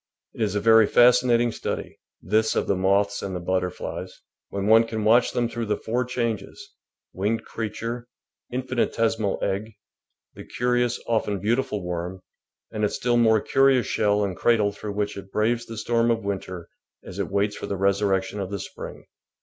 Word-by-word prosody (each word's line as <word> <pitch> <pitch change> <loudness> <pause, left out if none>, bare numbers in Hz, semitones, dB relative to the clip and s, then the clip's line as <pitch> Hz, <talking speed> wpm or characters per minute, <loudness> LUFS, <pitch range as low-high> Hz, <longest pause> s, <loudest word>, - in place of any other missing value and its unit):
It - - -8
is 105 -2 0
a - - +2
very 110 0 +6
fascinating 120 -1 +4
study - - -5
— - - -57
this 110 0 +3
of - - +1
the 100 - +1
moths 100 +2 +1
and 90 -3 -5
butterflies 90 -1 -3 0.2
— - - -65
when 100 0 -3
one 115 +2 +6
can 110 -1 -3
watch 115 +3 +4
them 120 -1 0
through 115 -1 -4
the 105 - 0
four 125 +3 -1
changes 115 -5 -4 0.2
— - - -64
winged 105 +4 -1
creature, 115 +2 -5 0.4
infinitesimal 115 -4 0
egg, 105 +3 -2 0.6
the - - -10
curious, 120 0 0
often 105 -3 0
beautiful, 110 0 -1
worm, 90 +1 -4 0.5
and 105 - -3
its 105 - +1
still 120 0 0
more 110 -2 +4
curious 135 -2 +3
shell 105 -1 +1
and 95 -3 -3
cradle 110 -4 +3
through 100 0 -6
which 105 0 -2
it 95 0 -10
braves 115 +2 0
the 115 - -8
storm 115 +1 +1
of 115 -2 0
winter 95 -3 -4 0.4
as 95 +1 -9
it 100 - -2
waits 100 +1 0
for - - -6
the 100 - -3
resurrection 100 0 +1
of 95 -2 -3
the 100 - -3
spring. - - -8
110 Hz, 180 wpm, -24 LUFS, 100-115 Hz, 0.6 s, very